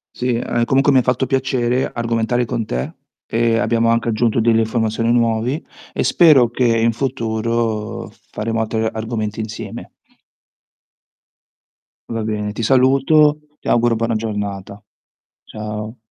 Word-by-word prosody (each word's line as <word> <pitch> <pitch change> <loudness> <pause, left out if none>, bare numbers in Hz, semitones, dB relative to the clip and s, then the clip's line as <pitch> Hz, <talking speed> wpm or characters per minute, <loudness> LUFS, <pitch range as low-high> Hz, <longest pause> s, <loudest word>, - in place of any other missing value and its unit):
Sì. 125 -1 -1
Ah, 120 -1 0
comunque 135 +3 +3
mi 130 -2 +5
fatto 125 +2 0
piacere 130 -2 0
argomentare 115 +1 0
con 110 0 -3
te. 65 -5 -4 0.3
Ehm, 115 0 +1
abbiamo 115 +1 +1
anche 115 0 +1
aggiunto 115 +1 +1
delle 115 0 +3
informazioni 110 0 0
nuovi, 120 +5 0 0.3
e - - -2
spero 140 -9 +5
che 125 +1 0
in 115 0 +3
futuro 115 -3 -2 0.2
faremo 115 +1 -3
altre 110 0 -1
argomenti 110 -1 -4
insieme. 110 0 -6 2.2
Va 115 -1 -3
bene, 105 -1 -2
ti 115 +2 -5
saluto, 135 +4 +4 0.2
ti - - -5
auguro 120 0 +3
buona 115 0 -1
giornata. 105 -2 -4 0.6
Ciao. 105 +2 -6
115 Hz, 125 wpm, -19 LUFS, 110-120 Hz, 2.2 s, mi